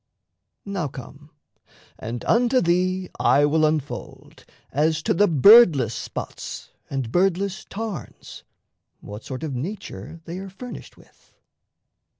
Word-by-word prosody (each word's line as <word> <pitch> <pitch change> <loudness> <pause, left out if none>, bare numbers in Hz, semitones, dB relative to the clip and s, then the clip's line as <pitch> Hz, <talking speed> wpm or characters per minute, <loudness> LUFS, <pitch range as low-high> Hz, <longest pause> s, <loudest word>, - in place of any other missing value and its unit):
Now 195 -6 -2
come; 140 +3 -11 0.7
and 115 +2 -6
unto 245 +2 +3
thee 185 +1 0
I 145 +1 +4
will 155 +1 +3
unfold, 150 -2 -5 0.3
As 155 +3 +1
to - - +1
the 205 +4 +4
Birdless 155 - +7
spots - - -7 0.2
and 135 -4 -3
Birdless 195 - 0
tarns, 210 - -7 0.6
What 105 +2 -9
sort 130 +3 -7
of 155 -4 -3
nature 165 - -6
they 170 +2 -6
are 195 0 -7
furnished 245 +6 -10
with. - - -24
165 Hz, 120 wpm, -23 LUFS, 140-195 Hz, 0.7 s, Birdless